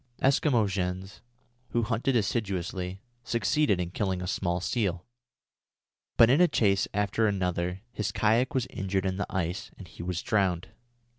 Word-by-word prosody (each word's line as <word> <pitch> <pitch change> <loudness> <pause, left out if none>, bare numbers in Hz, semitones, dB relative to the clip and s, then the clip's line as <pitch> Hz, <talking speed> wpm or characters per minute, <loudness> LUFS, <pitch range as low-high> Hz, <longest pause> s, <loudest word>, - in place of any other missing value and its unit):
Eskimo 130 -5 +3
Jens, 95 +1 -3 0.5
who 120 - +2
hunted 120 +4 0
assiduously, 95 -4 -2 0.2
succeeded 115 0 +1
in 90 -1 -2
killing 95 -1 -1
a 90 - -4
small 90 -1 -1
seal; 90 -3 -1 1.1
but 115 - +8
in 135 +8 +4
a 180 - +7
chase 100 - +2
after 105 +2 +1
another 90 -2 -1
his 105 -4 -2
kayak 115 +5 +2
was 130 - +1
injured 95 0 -1
in 95 0 -1
the 100 - -2
ice 90 0 -2
and 95 - -10
he 85 - -11
was 90 0 -3
drowned. 95 -6 +1
100 Hz, 150 wpm, -28 LUFS, 90-115 Hz, 1.1 s, but